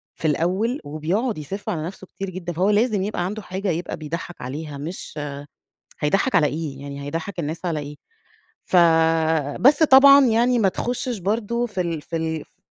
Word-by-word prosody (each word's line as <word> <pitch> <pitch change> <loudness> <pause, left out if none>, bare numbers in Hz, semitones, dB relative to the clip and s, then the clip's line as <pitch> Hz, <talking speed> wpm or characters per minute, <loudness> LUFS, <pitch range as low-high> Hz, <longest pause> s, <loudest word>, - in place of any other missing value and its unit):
في - - -7
الأوّل 185 - 0
وبيقعد 165 - -2
يسِف 190 +7 -6
على 155 -3 -2
نَفسه 190 +1 -8
كتير 195 0 -6
جدًا، 180 -1 -5
فهو 185 +5 +1
لازم 210 -1 +2
يبقى 195 -4 -2
عنده 210 +4 -4
حاجة 190 +1 -4
يبقى 170 +1 -3
بيضحّك 165 +3 -6
عليها، 145 +3 -6
مش 155 +1 -6 0.8
هيضحّك 195 - +1
على 150 - +5
إيه، 145 -3 -5
يعني 140 0 -7
هيضحك 165 +6 -5
الناس 160 +3 -4
على 165 -3 -1
إيه؟ 145 0 -7 0.7
ف 185 - +2 0.8
بس 290 +5 +5
طبعًا 275 -1 +8
يعني 240 +2 +3
ما 205 -4 +3
تخشش 245 +4 -3
برضو 225 +5 -1
في 200 -5 -4
ال 165 -4 -2
في 165 - -5
ال 160 -1 -2
ف - - -37
180 Hz, 175 wpm, -22 LUFS, 155-215 Hz, 0.8 s, طبعًا